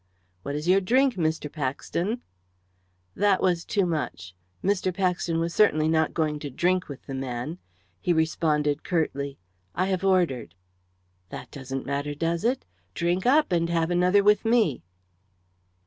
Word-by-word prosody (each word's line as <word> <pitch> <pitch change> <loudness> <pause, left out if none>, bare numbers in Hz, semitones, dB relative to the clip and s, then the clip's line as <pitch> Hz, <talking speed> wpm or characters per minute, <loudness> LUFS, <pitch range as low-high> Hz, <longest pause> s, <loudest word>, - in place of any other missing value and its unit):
"What 140 +9 -4
is 150 +3 -4
your 190 +2 +5
drink, 255 +7 +3
Mr. 160 -5 -1
Paxton?" 165 - -3 0.9
That 200 -2 +2
was 175 -3 +1
too 200 -3 +1
much; 150 - -3 0.3
Mr. 195 -1 +1
Paxton 180 -2 0
was 165 +1 -1
certainly 155 -7 +4
not 160 -1 +1
going 155 -2 0
to 145 - -5
drink 180 +6 0
with 140 - -8
the 135 - -6
man. 130 +5 -4 0.4
He 175 - 0
responded 155 -2 +1
curtly 140 -5 -1 0.4
"I 185 - +1
have 190 -1 -1
ordered." 160 - +1 0.7
"That - - -8
doesn't 135 -1 -5
matter, 140 +1 -2
does 165 +2 -1
it? 245 +3 0 0.3
Drink 175 +5 0
up, 295 -2 +4
and 170 -1 +1
have 165 0 +1
another 180 +3 +4
with 210 0 +4
me." 225 - +2
170 Hz, 145 wpm, -26 LUFS, 150-185 Hz, 0.9 s, your